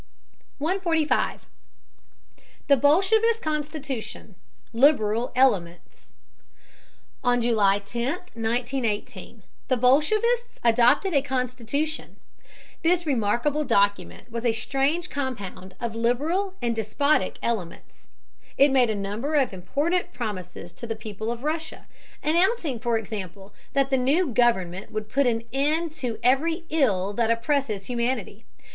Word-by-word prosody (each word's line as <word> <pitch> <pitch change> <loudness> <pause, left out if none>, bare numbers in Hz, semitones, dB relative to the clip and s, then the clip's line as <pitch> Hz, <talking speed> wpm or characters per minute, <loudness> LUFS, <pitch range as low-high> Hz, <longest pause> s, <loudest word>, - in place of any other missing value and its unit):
145. 325 -1 0 1.2
THE 280 - +6
BOLSHEVIST 395 - +3
CONSTITUTION: 295 -8 -4 0.4
LIBERAL 230 -3 +3
ELEMENTS. 190 -10 0 1.1
On 245 -1 +3
July 215 -4 +3
10, 235 +7 -3 0.2
1918, 230 -3 -3 0.2
the 255 0 +2
bolshevists 430 - +2
adopted 240 - +4
a 280 - +4
constitution. 265 +3 -3 0.7
This 345 +1 +2
remarkable 275 +3 +1
document 205 -1 0
was 230 0 -4
a 235 -2 +2
strange 280 +9 -1
compound 205 -9 -5
of 235 -2 -3
liberal 300 - 0
and 235 -1 0
despotic 225 +1 +1
elements. 210 -8 -5 0.5
It 280 +1 +5
made 255 -3 +4
a 215 - 0
number 210 +9 -3
of 270 -7 +2
important 290 - -1
promises 185 -7 -6
to 235 +7 -8
the 225 - -3
people 220 +1 -5
of 240 +1 -6
Russia, 315 +1 -3 0.4
announcing, 335 - +1
for 235 -1 0
example, 200 -2 -7 0.2
that 275 -1 +1
the 265 - +4
new 280 +3 +1
government 190 -6 +1
would 215 0 -4
"put 275 -1 +2
an 230 -1 0
end 305 +4 +1
to 240 -4 -2
every 320 +7 +2
ill 205 -11 +1
that 230 +1 0
oppresses 230 -3 0
humanity." 235 -3 -3
245 Hz, 115 wpm, -25 LUFS, 220-295 Hz, 1.2 s, THE